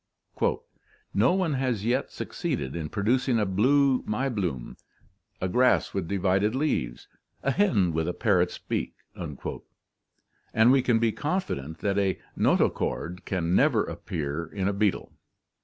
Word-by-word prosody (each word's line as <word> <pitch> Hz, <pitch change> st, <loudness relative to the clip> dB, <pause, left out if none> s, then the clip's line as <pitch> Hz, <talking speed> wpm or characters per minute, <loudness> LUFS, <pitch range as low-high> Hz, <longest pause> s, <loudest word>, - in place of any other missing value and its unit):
"No 110 Hz, -, +4 dB
one 185 Hz, -5 st, +1 dB
has 125 Hz, -6 st, -1 dB
yet 125 Hz, +4 st, +1 dB
succeeded 65 Hz, 0 st, -3 dB
in 80 Hz, -3 st, -4 dB
producing 120 Hz, +4 st, +1 dB
a 105 Hz, -, +2 dB
blue 130 Hz, +7 st, +3 dB
Maiblume, 105 Hz, -, -2 dB, 0.6 s
a 95 Hz, -, -1 dB
grass 125 Hz, +7 st, +3 dB
with 95 Hz, -4 st, -2 dB
divided 100 Hz, +4 st, +1 dB
leaves, 130 Hz, -, -1 dB, 0.4 s
a 140 Hz, -, +2 dB
hen 110 Hz, -, +2 dB
with 80 Hz, 0 st, 0 dB
a 90 Hz, -, -1 dB
parrot's 90 Hz, -6 st, +1 dB
beak." -, -, -3 dB, 0.2 s
And 110 Hz, +3 st, -3 dB
we 135 Hz, 0 st, +5 dB
can 120 Hz, -2 st, +2 dB
be 115 Hz, 0 st, +2 dB
con 155 Hz, -, -1 dB
fident 80 Hz, -, -6 dB
that 100 Hz, 0 st, +1 dB
a 95 Hz, -2 st, +1 dB, 0.2 s
notochord 90 Hz, +3 st, 0 dB
can 85 Hz, -3 st, -1 dB
never 125 Hz, -1 st, +4 dB
appear 80 Hz, -3 st, -4 dB
in 95 Hz, -2 st, -2 dB
a 100 Hz, -, +1 dB
beetle. 100 Hz, -1 st, 0 dB
105 Hz, 140 wpm, -27 LUFS, 90-130 Hz, 0.6 s, we